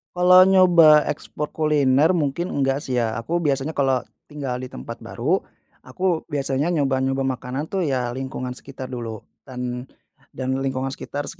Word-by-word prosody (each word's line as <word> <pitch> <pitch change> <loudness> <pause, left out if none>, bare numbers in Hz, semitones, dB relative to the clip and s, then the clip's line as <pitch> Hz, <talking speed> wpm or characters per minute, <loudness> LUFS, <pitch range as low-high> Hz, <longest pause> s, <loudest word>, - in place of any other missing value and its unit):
Kalau 180 +1 +7
nyoba 175 -5 +6
ekspor 150 0 -5
kuliner 150 -1 +3
mungkin 155 +4 -1
enggak 135 0 0
sih 125 -1 -2
ya, 115 -2 0
aku 140 +10 -2
biasanya 145 -1 -1
kalau 135 -3 +2 0.2
tinggal 140 -4 -4
di 130 - -6
tempat 115 -2 -8
baru, 135 +11 0 0.5
aku 180 -3 -1
biasanya 145 +2 -1
nyoba-nyoba 135 -2 0
makanan 130 +3 -3
tuh 190 -3 -1
ya 125 -4 -1
lingkungan 130 -1 -5
sekitar 130 -1 -9
dulu 115 -4 -6 0.2
dan 125 -1 -5 0.5
dan 130 0 -2
lingkungan 135 0 -2
sekitar 145 0 -5
135 Hz, 145 wpm, -22 LUFS, 130-155 Hz, 0.5 s, Kalau